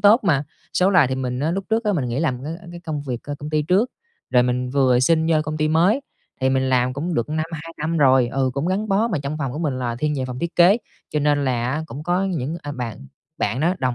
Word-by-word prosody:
tốt 205 +4 +6
mà. 150 -6 +2 0.3
Số 185 +2 +4
là 180 -7 +5
thì 130 - -1
mình 125 -1 -3
á 155 +3 +1
lúc 195 +2 -2
trước 225 +1 +1
á, 210 - +2
mình 155 -9 0
nghỉ 120 +4 -1
làm 130 -6 -1
ng 155 +4 -4
cái 175 0 -9
công 155 -4 -4
việc 130 -4 -3
c - - -19
công 150 +1 -6
ty 155 -1 +1
trước, 195 - +2 0.4
rồi 125 -1 +5
mình 125 0 -1
vừa 130 -2 +3
xin 160 +4 +3
vô 160 - +4
công 155 0 -3
ty 155 0 +1
mới. 175 - +3 0.4
Thì 130 - +2
mình 130 0 +1
làm 125 -1 +2
cũng 160 +6 -3
được 120 +1 0
năm, 155 +1 -1
2 165 +1 -6
năm 160 +2 -1
rồi, 130 -4 +5
ừ, 135 0 0
cũng 140 +4 -1
gắn 200 +4 -1
bó. 210 +4 +2
Mà 190 -9 -1
trong 140 +2 -4
phòng 135 -4 -2
của 150 - -5
mình 145 -6 -1
là 120 -2 -2
thiên 150 +4 0
về 130 - -1
phòng 125 -1 -5
thiết 170 +3 -4
kế, 180 +4 +7 0.3
cho 150 - 0
nên 145 -1 +2
là 125 -1 0
á 150 +4 -1
cũng 145 - -7
có 175 +4 +1
những, 165 -5 -2
à, 145 0 -5
bạn 115 - -6 0.3
bạn 110 +6 -1
đó 170 +4 +2
đồng 130 -2 0
150 Hz, 280 wpm, -22 LUFS, 130-170 Hz, 0.4 s, kế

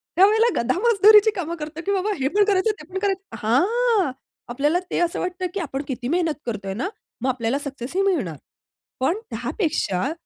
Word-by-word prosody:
त्यावेळेला 420 +5 +5 0.2
गधा 255 +6 0
मजदुरीची 430 -1 +6
कामं 340 -2 -3
करतो, 310 +1 -6
की 400 - 0
बाबा 400 +1 0
हे 265 - +1
पण 410 +8 +3
करायचं 400 +1 +2
ते - - -12
पण 380 - -1
करायचं. 390 -1 -2
हां, 390 - +2 0.4
आपल्याला 290 +8 +1
ते - - 0
असं 345 -1 0
वाटतं, 365 0 -2
की 400 - -2
आपण 280 -6 -3
किती 255 -2 -4
मेहनत 330 +1 +1
करतोय 205 -5 -4
ना? 240 - -2 0.3
मग 260 - 0
आपल्याला 250 +1 -1
सक्सेस 280 0 -6
ही 385 - +3
मिळणार. 270 - 0 0.6
पण 270 +9 +1
त्यापेक्षा 295 - -1
340 Hz, 180 wpm, -23 LUFS, 265-395 Hz, 0.6 s, मजदुरीची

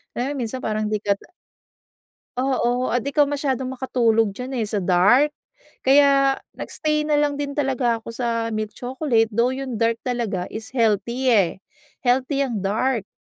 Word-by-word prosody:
Lalo 275 +4 -2
minsan 250 +1 -4
parang 215 0 -1
di 210 -1 -1
ka 200 -1 +1 1.2
Oo, 255 -1 0
at 245 - +2
di 280 +6 -5
ka 295 - +6
masyadong 275 -3 -1
makatulog 230 -4 +2
diyan 255 +1 -6
eh 215 - -1
sa 205 -3 -2
dark. 205 +12 +4 0.5
Kaya 275 0 +5 0.2
nag-stay 305 -1 -2
nalang 295 -1 +1
din 280 -1 -3
talaga 260 -4 +1
ako 230 - -7
sa 230 -1 -2
milk 215 -1 -3
chocolate 245 -3 0
though 240 +4 +1
yung 260 -4 -4
dark 230 0 +2
talaga 230 -8 -2
is 220 0 -6
healthy 235 +3 +1
eh. 195 -7 +4 0.5
Healthy 260 +3 +2
ang 235 -6 -2
dark 215 +3 0
245 Hz, 155 wpm, -22 LUFS, 225-270 Hz, 1.2 s, ka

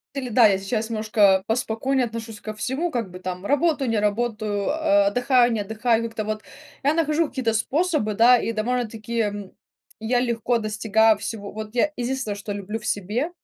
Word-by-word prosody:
Или 265 -2 -3
да, 235 -1 +6
я 195 -2 +3
сейчас 220 +3 -3
немножко 210 -3 +3
поспокойнее 245 +3 0
отношусь 225 -2 -7
ко 215 - -6
всему, 265 +10 -2
как 230 - -3
бы, 180 - -9
там: 185 +1 -6
работаю, 290 -2 +1
не 225 -2 +1
работаю, 210 -1 -1
а, 305 -1 +3
отдыхаю, 245 -3 +3
не 220 - -1
отдыхаю. 220 +3 0
Как-то 225 -2 -4
вот 215 0 -3 0.4
я 285 - +3
нахожу 315 0 +1
какие-то 240 -6 -1
способы, 290 -2 0
да, 240 +4 +6
и 230 - -2
довольно-таки, 230 0 -2
м, 205 -2 -3 0.5
я 245 +3 +1
легко 235 0 0
достигаю 220 0 +2
всего. 205 0 -6
Вот 215 +1 -7
я 300 +5 +2
единственное, 245 -3 -2
что 205 +1 -6
люблю 205 +2 -5
в 215 - -15
себе, 215 - -1
225 Hz, 180 wpm, -23 LUFS, 210-250 Hz, 0.5 s, да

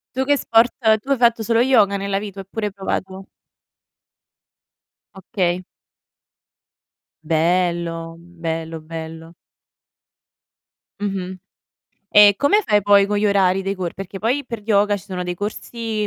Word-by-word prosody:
Tu 265 - 0
che 285 0 +3
sport 230 +1 +3 0.3
tu 270 - -14
hai 275 - +3
fatto 235 -2 +2
solo 230 +1 +1
yoga 210 -6 +3
nella 195 0 -2
vita 200 -2 -8
oppure 210 +2 -4
hai - - -6
provato 190 -1 -5 1.9
Okay. 185 -2 -2 1.6
Bello. 165 0 0
Bello, 165 -1 -5
bello. 160 +1 -9 1.7
Mh-mh. 190 -2 -4 0.7
E 205 -1 +7
come 410 +10 +3
fai 210 - +2
poi 200 0 +5
con 205 0 -1
gli 210 - +1
orari 195 -2 +2
dei 195 +1 -2
cor 180 -3 -4
perché 195 0 -8
poi 255 +7 -1
per 230 -4 -6
yoga 205 -1 +2
ci 195 - -11
sono 185 -2 -5
dei 180 0 -4
corsi, 215 +2 -4
195 Hz, 130 wpm, -20 LUFS, 175-215 Hz, 1.9 s, E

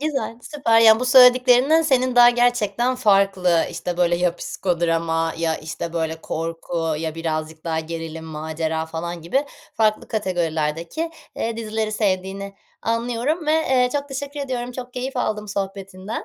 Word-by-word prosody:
Güzel, 280 -6 -2
süper. 235 -7 +2
Ya, 220 0 +7
bu - - 0
söylediklerinden 255 +4 +6
senin 255 -4 +1
daha 240 0 +9
gerçekten 240 0 +1
farklı, 195 -7 +3
işte, 170 +1 -4
böyle, 175 -1 +2
ya 175 0 0
psikodrama 165 -2 -1
ya, 165 -1 0
işte, 160 +1 -6
böyle, 160 -1 -2
korku 165 0 -3
ya 160 -1 -3
birazcık 160 -1 -4
daha 160 -1 -1
gerilim, 165 0 -6
macera 160 +1 -3
falan 170 +1 -5
gibi 265 - 0 0.3
farklı 215 -1 +1
kategorilerdeki, 170 - -2 0.3
eee, 230 0 -2
dizileri 220 -1 -3
sevdiğini 195 -1 -2 0.3
anlıyorum 240 +8 -1
ve, 305 - +3
eee, 260 -6 +2
çok 285 -1 -2
teşekkür 285 +2 -5
ediyorum, 250 -3 -4
çok 250 0 -8
keyif 260 +1 -4
aldım 210 -3 -2
sohbetinden. 195 +1 -5
200 Hz, 145 wpm, -22 LUFS, 165-245 Hz, 0.3 s, daha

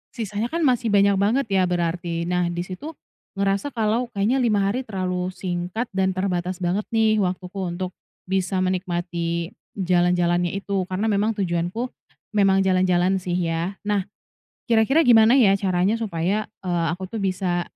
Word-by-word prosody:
sisanya 215 -1 -2
kan 330 +5 -2
masih 250 -3 +2
banyak 200 -1 +4
banget 225 +8 +2
ya 185 -2 +3
berarti, 170 -1 -1
nah 180 0 0
di 175 0 -3
situ 280 - -8 0.4
ngerasa 195 +6 0
kalau 225 +2 +1
kayaknya 220 +7 +2
5 210 -5 +2
hari 200 +6 0
terlalu 185 -3 -2
singkat 185 +5 -4
dan 190 -1 0
terbatas 185 -1 -1
banget 185 +4 -1
nih 220 -1 +2
waktuku 185 0 -2 0.2
untuk 185 0 -4 0.3
bisa 185 0 0
menikmati 175 -2 -2 0.2
jalan-jalannya 175 -1 +1
itu 195 -2 -2
karena 200 +4 -1
memang 210 +2 +1
tujuanku 185 +5 -2 0.4
memang 195 -2 +3
jalan-jalan 185 0 +2
sih 180 -1 -3
ya. 170 +2 -1
Nah, 205 -2 0 0.6
kira-kira 245 +6 +3
gimana 230 +2 +6
ya 200 -6 +5
caranya 190 +1 +1
supaya, 205 -2 -2 0.2
eee, 175 -2 0
aku 185 +2 -4
tuh 210 +2 -5
bisa 185 -2 0
190 Hz, 150 wpm, -23 LUFS, 180-210 Hz, 0.6 s, gimana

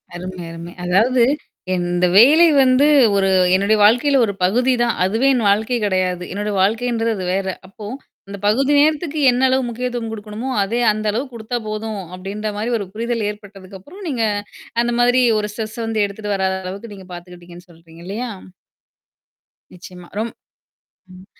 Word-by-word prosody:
அருமை, 180 0 -7
அருமை. 170 +1 -9
அதாவது 230 +7 +3 0.5
இந்த 175 0 0
வேலை 300 +9 +7 0.2
வந்து 255 +2 +4 0.3
ஒரு 195 -1 +2 0.3
என்னுடைய 200 +3 +2
வாழ்க்கையில 260 +6 +4
ஒரு 200 - -3
பகுதி 245 +7 +2
தான். 235 - 0
அதுவே 225 +8 +1
என் 230 -5 +1
வாழ்க்கை 220 +4 +1
கிடையாது. 185 -2 -1
என்னுடைய 205 +1 -3
வாழ்க்கைன்றது 230 +2 0
அது 185 - -4
வேற. 195 0 -1 0.2
அப்போ 205 +1 -10 0.4
அந்த 200 0 -7
பகுதி 265 +7 +2
நேரத்துக்கு 305 0 +1
என்ன 245 +1 -1
அளவு 260 0 +1
முக்கியத்துவம் 240 -1 -4
கொடுக்கணுமோ! 215 +4 -6
அதே 230 +5 -2
அந்த 215 0 -4
அளவு 240 +6 -2
கொடுத்தா 230 +2 -5
போதும் 215 -1 -4
அப்பிடின்றமாரி 210 +4 -4
ஒரு 200 - -5
புரிதல் 230 0 -2
ஏற்பட்டதுக்கு 200 -2 -10
அப்புறம், 370 - -13
நீங்க 240 -5 -1 0.6
அந்த 240 0 0
மாதிரி 245 +1 +4 0.2
ஒரு 210 0 -3
ஸ்ட்ரெஸ்ஸ 220 +1 -6
வந்து 220 -2 0
எடுத்துட்டு 205 0 -4
வராத 190 0 -1
அளவுக்கு 200 +4 -7
நீங்க 190 -1 -13
பார்த்துக்கிட்டிங்கன்னு 175 0 -12
சொல்றீங்க 165 0 -17
இல்லயா! 230 +6 -4 1.5
நிச்சயமா. 180 0 -12
ரொம் 230 +1 -2 0.8
ம் 185 - -14
210 Hz, 150 wpm, -19 LUFS, 190-240 Hz, 1.5 s, வேலை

